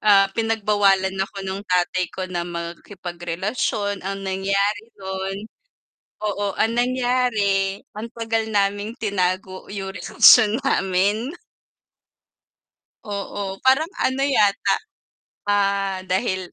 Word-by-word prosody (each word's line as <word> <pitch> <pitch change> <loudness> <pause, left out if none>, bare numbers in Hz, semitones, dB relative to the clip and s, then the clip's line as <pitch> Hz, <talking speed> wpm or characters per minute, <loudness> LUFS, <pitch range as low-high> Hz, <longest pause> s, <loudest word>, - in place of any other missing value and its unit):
Ah, 195 -2 +5
pinagbawalan 205 -4 +2
ako 195 0 -4
ng 190 +1 -3
tatay 180 0 +1
ko 185 - -5
na 180 -2 -3
makipagrelasyon. 175 +4 -3
Ang 195 +1 -5
nangyari 200 +3 0
nun 190 0 -4 0.9
oo, 205 -1 -1
ang 225 - +2
nangyari, 240 -6 +1 0.2
ang 220 +2 -5
tagal 225 -1 -1
naming 205 +1 0
tinago 185 -2 -1
yung 195 -1 -4
relasyon 210 +4 +6
namin. 200 - +1 1.8
Oo, 200 -1 -4
parang 270 +5 +4 0.2
ano 260 +1 +1
yata, 205 -7 +3 0.7
ah, 195 -2 +1
dahil 185 -1 -1
200 Hz, 100 wpm, -22 LUFS, 190-215 Hz, 1.8 s, relasyon